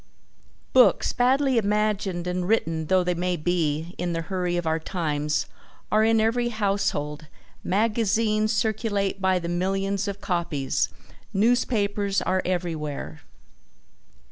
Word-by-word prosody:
Books, 255 Hz, -1 st, +5 dB
badly 260 Hz, +1 st, +3 dB
imagined 205 Hz, -4 st, 0 dB
and 180 Hz, 0 st, -2 dB
written 165 Hz, -7 st, 0 dB
though 185 Hz, +1 st, +3 dB
they 180 Hz, 0 st, 0 dB
may 180 Hz, +1 st, -1 dB
be 160 Hz, 0 st, -1 dB
in 175 Hz, 0 st, -1 dB
the 165 Hz, 0 st, -2 dB
hurry 180 Hz, 0 st, -2 dB
of 175 Hz, -, -2 dB
our 160 Hz, 0 st, +1 dB
times, 150 Hz, -4 st, -1 dB, 0.5 s
are 215 Hz, 0 st, +4 dB
in 225 Hz, 0 st, +4 dB
every 235 Hz, +2 st, +1 dB
household, 195 Hz, -9 st, -1 dB, 0.4 s
magazines 215 Hz, +1 st, +1 dB
circulate 215 Hz, -3 st, -1 dB
by 190 Hz, -1 st, +3 dB
the 170 Hz, -1 st, -4 dB
millions 195 Hz, +3 st, -1 dB
of 200 Hz, 0 st, -4 dB
copies, 170 Hz, -9 st, -1 dB, 0.5 s
newspapers 205 Hz, -3 st, +1 dB
are 185 Hz, 0 st, 0 dB
everywhere. 160 Hz, -4 st, -3 dB
190 Hz, 120 wpm, -25 LUFS, 170-215 Hz, 0.5 s, Books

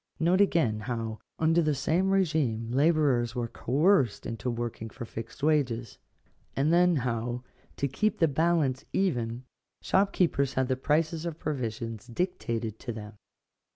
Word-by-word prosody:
Note 175 Hz, +4 st, +3 dB
again 145 Hz, -, +2 dB
how, 110 Hz, 0 st, -4 dB, 0.2 s
under 165 Hz, +2 st, +3 dB
the 155 Hz, -2 st, +1 dB
same 170 Hz, +7 st, +1 dB
regime, 150 Hz, -, +1 dB
labourers 135 Hz, -4 st, +2 dB
were 120 Hz, -1 st, -1 dB
coerced 140 Hz, -, +2 dB
into 115 Hz, +2 st, -3 dB
working 120 Hz, -1 st, -4 dB
for 120 Hz, +2 st, -8 dB
fixed 115 Hz, +5 st, -8 dB
wages; 130 Hz, -7 st, 0 dB, 0.6 s
and 145 Hz, +4 st, +2 dB
then 175 Hz, 0 st, +5 dB
how, 120 Hz, -2 st, -2 dB, 0.3 s
to 140 Hz, -, 0 dB
keep 215 Hz, +11 st, 0 dB
the 165 Hz, -, +4 dB
balance 150 Hz, -3 st, +1 dB
even, 125 Hz, -10 st, 0 dB, 0.4 s
shopkeepers 180 Hz, -8 st, +2 dB
had 130 Hz, 0 st, +1 dB
the 130 Hz, -, +2 dB
prices 155 Hz, +4 st, 0 dB
of 170 Hz, -3 st, -4 dB
provisions 115 Hz, -7 st, -4 dB
dictated 115 Hz, -, -3 dB
to 120 Hz, -, -5 dB
them. 105 Hz, -1 st, -8 dB
135 Hz, 140 wpm, -28 LUFS, 115-165 Hz, 0.6 s, then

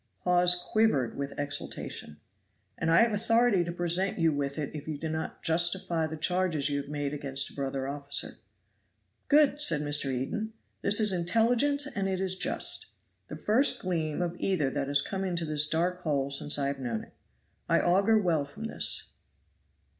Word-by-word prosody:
Hawes 180 Hz, 0 st, +4 dB
quivered 180 Hz, -, +1 dB
with 140 Hz, 0 st, -5 dB
exultation. 145 Hz, -, -6 dB, 0.6 s
"And 165 Hz, -, -2 dB
I 170 Hz, +7 st, +6 dB
have 230 Hz, -2 st, +1 dB
authority 225 Hz, -2 st, +2 dB
to 170 Hz, -, -4 dB
present 175 Hz, +2 st, 0 dB
you 165 Hz, -2 st, +2 dB
with 140 Hz, 0 st, -3 dB
it 150 Hz, -3 st, -4 dB
if 150 Hz, -1 st, -8 dB
you 155 Hz, -2 st, -4 dB
do 160 Hz, +2 st, -5 dB
not 160 Hz, 0 st, -5 dB
justify 170 Hz, 0 st, +2 dB
the 160 Hz, +1 st, -6 dB
charges 165 Hz, -3 st, 0 dB
you 140 Hz, 0 st, -1 dB
have 140 Hz, -, -12 dB
made 145 Hz, -1 st, -3 dB
against 140 Hz, -1 st, -2 dB
a -, -, -15 dB
brother 135 Hz, -1 st, -3 dB
officer." 140 Hz, 0 st, -4 dB, 0.9 s
"Good!" 295 Hz, 0 st, +4 dB
said 160 Hz, -, +4 dB
Mr. 145 Hz, -2 st, +2 dB
Eden. 135 Hz, -, -3 dB, 0.3 s
"This 205 Hz, +2 st, +4 dB
is 210 Hz, -3 st, +4 dB
intelligent 230 Hz, +11 st, +2 dB
and 195 Hz, -1 st, -1 dB
it 190 Hz, -1 st, -2 dB
is 190 Hz, -1 st, -1 dB
just. 315 Hz, -, +1 dB, 0.4 s
The -, -, -7 dB
first 240 Hz, +7 st, +2 dB
gleam 165 Hz, -2 st, -2 dB
of 175 Hz, 0 st, -3 dB
either 155 Hz, -9 st, 0 dB
that 140 Hz, -1 st, -2 dB
has 140 Hz, 0 st, +2 dB
come 195 Hz, -1 st, -4 dB
into 175 Hz, -3 st, -2 dB
this 150 Hz, -1 st, +1 dB
dark 175 Hz, +3 st, -1 dB
hole 140 Hz, -3 st, -1 dB
since 145 Hz, +1 st, +2 dB
I 140 Hz, -, 0 dB
have 140 Hz, 0 st, -2 dB
known 120 Hz, -4 st, -3 dB
it. -, -, -17 dB, 0.6 s
I -, -, +4 dB
augur 195 Hz, +5 st, +3 dB
well 170 Hz, -8 st, +1 dB
from 145 Hz, +10 st, -10 dB
this." 225 Hz, -, -4 dB
165 Hz, 180 wpm, -29 LUFS, 145-190 Hz, 0.9 s, I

